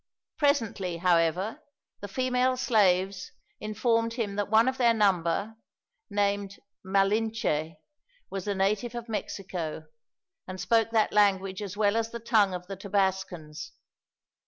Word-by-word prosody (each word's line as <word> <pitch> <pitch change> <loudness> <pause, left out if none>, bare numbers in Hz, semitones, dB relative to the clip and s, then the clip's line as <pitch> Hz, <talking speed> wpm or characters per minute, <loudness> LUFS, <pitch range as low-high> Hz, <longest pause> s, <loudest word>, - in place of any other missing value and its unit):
Presently, 225 - +1
however, 180 - +1 0.4
the 205 - -6
female 255 +3 +1
slaves 195 -5 +2 0.3
informed 230 +2 0
him 220 -4 -3
that 205 0 -2
one 220 +3 +5
of 260 0 -1
their 235 -2 +4
number, 200 +1 +1 0.5
named 200 -1 -1 0.3
Malinche, 195 -5 0 0.6
was 195 0 -5
a 200 - 0
native 210 +5 0
of 235 0 -6
Mexico, 185 -7 -4 0.6
and 185 0 -7
spoke 225 +1 +2
that 225 -2 +1
language 195 -2 +2
as 205 -1 -6
well 205 0 +2
as 225 0 0
the 235 - -6
tongue 215 -5 +2
of 180 0 -7
the 195 +2 -6
Tabascans. 190 -5 -2
205 Hz, 130 wpm, -28 LUFS, 190-225 Hz, 0.6 s, one